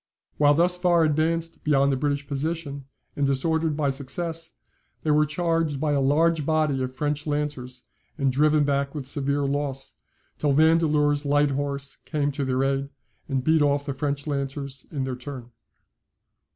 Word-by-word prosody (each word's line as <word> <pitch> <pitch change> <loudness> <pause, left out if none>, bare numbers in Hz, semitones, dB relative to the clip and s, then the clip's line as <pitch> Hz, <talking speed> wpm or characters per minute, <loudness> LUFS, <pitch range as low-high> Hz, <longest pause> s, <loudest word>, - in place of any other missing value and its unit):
While 145 0 +5
thus 175 +3 +3
far 175 -2 +3
advanced 160 +2 0
beyond 140 -2 +3
the - - +1
British 145 +1 -1
position 145 -1 -3 0.3
and 145 -1 +1
disordered 160 +3 0
by 145 -3 +1
success, 165 +5 -3 0.5
they 155 - +1
were 150 0 +4
charged 165 -2 0
by 150 0 0
a 140 -1 +2
large 155 +3 +2
body 155 -3 +1
of 130 0 -4
French 150 +2 -2
lancers, 145 -4 -3 0.3
and 135 -3 +1
driven 150 +3 +3
back 140 0 0
with 140 -3 -5
severe 140 0 0
loss, 140 -1 -3 0.5
till 145 -2 +2
Vandeleur's 150 -1 +3
Light 145 0 +2
horse 140 0 -2
came 145 -2 -2
to 140 0 -3
their 130 0 0
aid, 135 0 0 0.4
and 135 -2 -1
beat 160 +2 +3
off 145 0 +2
the 140 - -3
French 140 +1 -2
lancers 140 -1 -4
in 140 -3 -3
their 130 -1 -3
turn. 125 -1 -8
145 Hz, 165 wpm, -25 LUFS, 140-155 Hz, 0.5 s, While